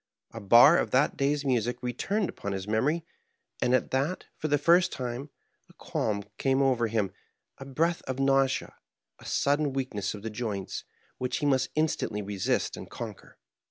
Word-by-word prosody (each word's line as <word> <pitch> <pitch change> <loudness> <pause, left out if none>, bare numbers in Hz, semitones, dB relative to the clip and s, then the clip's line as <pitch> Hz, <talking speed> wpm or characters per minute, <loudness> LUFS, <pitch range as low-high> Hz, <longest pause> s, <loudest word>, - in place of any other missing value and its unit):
A 115 - -8
bar 120 - +7
of - - -1
that 135 +3 +2
day's 140 +1 0
music 125 -1 0
returned 185 - -1
upon 100 - -5
his 95 0 -5
memory; 145 +10 +1 0.6
and 125 - +3
at 130 - -1
that, 140 +8 -1
for 155 - -3
the 145 -1 +3
first 170 +4 +4
time, 125 +3 -5 0.4
a - - -19
qualm 100 -2 -2 0.2
came 135 0 +2
over 130 -4 +2
him, 105 -3 0 0.5
a 135 - -8
breath 165 +6 0
of 130 -1 -3
nausea, 135 -1 +2 0.5
a - - -15
sudden 145 0 +1
weakness 110 -7 -2
of 100 - -10
the 115 - -4
joints, 105 -4 -4 0.3
which 125 -1 -1
he - - -2
must 130 -2 +2
instantly 150 -9 0
resist 100 -1 -1
and - - -9
conquer. - - -8
130 Hz, 170 wpm, -28 LUFS, 115-145 Hz, 0.6 s, bar